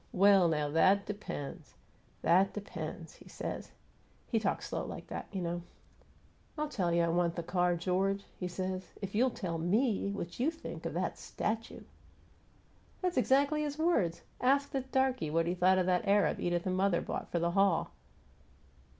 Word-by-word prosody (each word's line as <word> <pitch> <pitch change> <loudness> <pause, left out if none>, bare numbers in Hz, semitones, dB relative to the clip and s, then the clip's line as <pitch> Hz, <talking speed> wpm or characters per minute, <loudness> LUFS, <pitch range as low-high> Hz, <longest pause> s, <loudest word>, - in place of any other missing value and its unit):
'Well, 195 -1 +6
now, 150 -2 +1
that 190 +6 +4
depends 200 -9 -6 0.5
that 190 +3 +4
depends,' 205 -1 -6
he - - -16
says. - - -5 0.6
He 225 - 0
talks 205 -2 -1
slow - - -2
like - - -7
that, - - -5
you 190 -3 -3
know. 175 0 -2 1.0
'I'll 300 0 -1
tell 190 -11 0
you 170 0 +3
what - - +3
time 165 - 0
I - - +1
want 170 -1 +1
the 170 - -3
car, 175 +1 +1
George,' 190 +3 0
he 180 - -4
says, 185 +1 -3 0.2
'if 195 - -4
you'll 245 +5 +3
tell 175 -9 -4
ME 200 +5 +1
what 195 -2 -5
you 265 +6 +3
think 325 0 -6
of - - -6
this - - -2
statue!' 225 +1 -3 1.2
That's 365 -1 0
exactly 280 +4 +3
his 295 -1 -3
words! 230 - +1 0.2
Asked 275 +2 +3
the 270 -3 0
darky 260 - 0
what 165 +2 +1
he 175 - 0
thought 185 +1 +4
of 185 - +2
that 180 +2 +1
Arab 200 0 +3
Edith 175 -1 0
and 185 -1 0
mother 190 -2 +2
bought - - -4
for - - 0
the 170 0 +1
hall!" 195 -2 +2
190 Hz, 180 wpm, -32 LUFS, 175-230 Hz, 1.2 s, Well